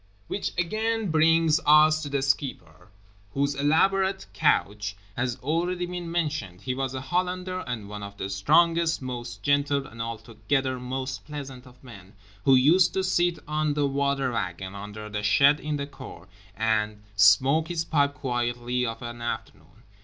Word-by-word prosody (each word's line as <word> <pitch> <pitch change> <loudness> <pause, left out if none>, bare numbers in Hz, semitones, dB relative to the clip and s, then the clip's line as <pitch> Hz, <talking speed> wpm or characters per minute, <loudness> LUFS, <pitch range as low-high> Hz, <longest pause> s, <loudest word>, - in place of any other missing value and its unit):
Which 200 - -3
again 215 +3 -1
brings 160 0 +4
us 155 +1 +6
to 145 - -5
the 140 -1 -1
Skipper, 105 - -3 0.5
whose 140 +1 +1
elaborate 190 +7 +2
couch 105 0 +1 0.2
has 120 0 -1
already 175 +5 -1
been 175 -1 -6
mentioned—he 135 - -2
was 135 0 -3
a 130 - -4
Hollander 180 +5 -2
and 115 -5 -4
one 105 0 -7
of 100 0 -8
the 95 - -4
strongest, 165 - +3
most 120 -4 -6
gentle 145 -1 +1
and 115 0 -9
altogether 120 +4 -2
most 130 +1 -4
pleasant 135 -4 -8
of 125 +1 -18
men, 100 -6 -13 0.3
who 135 - +6
used 160 +8 +4
to 190 - +1
sit 175 -2 +1
on 150 -1 0
the 145 -1 +1
water 140 -1 0
wagon 95 -3 -4
under 105 +1 -8
the 105 0 -4
shed 140 +8 +4
in 150 0 -3
the 140 - -3
cour 95 -10 -11 0.3
and 110 -1 0
smoke 130 +11 +5
his 165 -1 -2
pipe 145 -3 +1
quietly 120 -1 -2
of 115 +1 -6
an 120 0 -7
afternoon. 110 -4 -6
135 Hz, 155 wpm, -26 LUFS, 115-155 Hz, 0.5 s, us